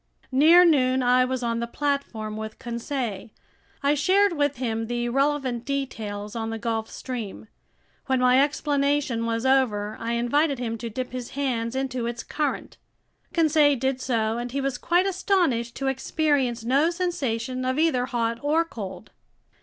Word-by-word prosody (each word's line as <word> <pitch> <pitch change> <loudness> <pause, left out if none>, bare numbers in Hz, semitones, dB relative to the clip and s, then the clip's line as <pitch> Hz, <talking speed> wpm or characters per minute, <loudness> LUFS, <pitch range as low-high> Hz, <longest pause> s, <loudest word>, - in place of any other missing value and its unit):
Near 325 +7 +7
noon 260 -5 +3
I 250 +1 +4
was 255 -1 -3
on 230 -1 -1
the 235 - -2
platform 240 -6 -2
with 220 0 -6
Conseil. 235 -3 -4 0.5
I 285 +1 +4
shared 375 +6 +3
with 290 -2 +1
him 225 -3 -2
the 240 0 -2
relevant 270 -2 0
details 220 -7 -4
on 225 -1 -3
the 225 - -3
Gulf 225 -1 -2
Stream. 230 -5 -6 0.6
When 260 -1 +2
my 250 +1 +5
explanation 280 -4 0
was 230 +1 -1
over, 220 -6 +2
I 230 +1 -2
invited 275 +5 +1
him 235 -2 -3
to 235 - -4
dip 250 +3 -5
his 250 -1 -5
hands 245 -4 -1
into 255 -3 -2
its 235 0 -4
current. 300 -2 -3 0.5
Conseil 310 -3 +4
did 265 +1 -1
so, 230 -3 0
and 240 0 -4
he 275 - -2
was 270 -2 -2
quite 350 +6 +2
astonished 355 - +1
to 275 - -4
experience 265 -3 0
no 275 +7 +3
sensation 260 -9 -2
of 260 +1 -1
either 300 -6 +2
hot 235 -2 -1
or 315 +3 +2
cold. 195 - -8
255 Hz, 160 wpm, -25 LUFS, 230-285 Hz, 0.6 s, Near